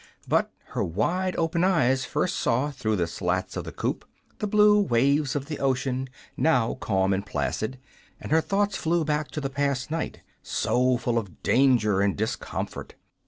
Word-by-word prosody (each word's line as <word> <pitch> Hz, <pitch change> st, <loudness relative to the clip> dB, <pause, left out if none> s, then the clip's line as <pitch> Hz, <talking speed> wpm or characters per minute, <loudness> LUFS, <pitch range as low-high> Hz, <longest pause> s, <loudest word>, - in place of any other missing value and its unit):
But -, -, +2 dB, 0.2 s
her -, -, -1 dB
wide 180 Hz, -, 0 dB
open 165 Hz, +1 st, 0 dB
eyes 135 Hz, -8 st, +3 dB
first -, -, -1 dB
saw, 130 Hz, +6 st, +1 dB
through 115 Hz, -6 st, -1 dB
the 90 Hz, -4 st, +1 dB
slats 90 Hz, +2 st, -2 dB
of -, -, -4 dB
the -, -, -6 dB
coop, -, -, -3 dB, 0.4 s
the 210 Hz, -, -1 dB
blue 210 Hz, 0 st, +5 dB
waves 140 Hz, 0 st, +2 dB
of 140 Hz, -1 st, -2 dB
the 150 Hz, 0 st, -5 dB
ocean, 130 Hz, -1 st, 0 dB, 0.3 s
now 125 Hz, -8 st, +2 dB
calm 95 Hz, -1 st, 0 dB
and 95 Hz, +1 st, -1 dB
placid, 110 Hz, +4 st, -2 dB, 0.4 s
and -, -, -8 dB
her 160 Hz, +1 st, +5 dB
thoughts 200 Hz, +3 st, 0 dB
flew 165 Hz, -1 st, 0 dB
back 150 Hz, 0 st, -1 dB
to -, -, -4 dB
the 140 Hz, -, -2 dB
past 140 Hz, 0 st, -1 dB
night, 160 Hz, 0 st, -3 dB, 0.2 s
so 125 Hz, 0 st, +1 dB
full 120 Hz, -1 st, 0 dB
of 100 Hz, -6 st, -10 dB
danger 120 Hz, -7 st, +3 dB
and 100 Hz, -1 st, +1 dB
discomfort. 110 Hz, +4 st, -4 dB
130 Hz, 170 wpm, -26 LUFS, 110-160 Hz, 0.4 s, blue